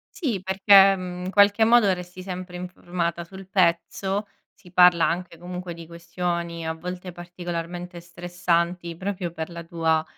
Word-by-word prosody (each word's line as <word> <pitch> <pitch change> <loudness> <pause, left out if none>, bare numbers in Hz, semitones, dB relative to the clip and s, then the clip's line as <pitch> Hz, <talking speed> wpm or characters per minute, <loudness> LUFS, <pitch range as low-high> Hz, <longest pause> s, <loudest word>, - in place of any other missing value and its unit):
Sì, 240 - -2
perché, 195 +1 +6
mhmm, 180 -1 -6
in 185 - -3
qualche 205 +2 +5
modo 230 -3 +5
resti 180 0 -8
sempre 180 -1 -6
informata 175 -1 -3
sul 190 +2 -12
pezzo. 190 +2 +1 0.3
Si 180 -4 -19
parla 180 -2 +6
anche 175 0 -3
comunque 180 +1 -6
di 165 0 -10
questioni, 170 0 -4
a 160 - -1
volte 180 +2 -7
particolarmente 175 0 -6
stressanti, 175 0 -2
proprio 185 -2 -3
per 160 0 -5
la 170 0 -8
tua 165 -2 0
180 Hz, 145 wpm, -24 LUFS, 170-185 Hz, 0.3 s, perché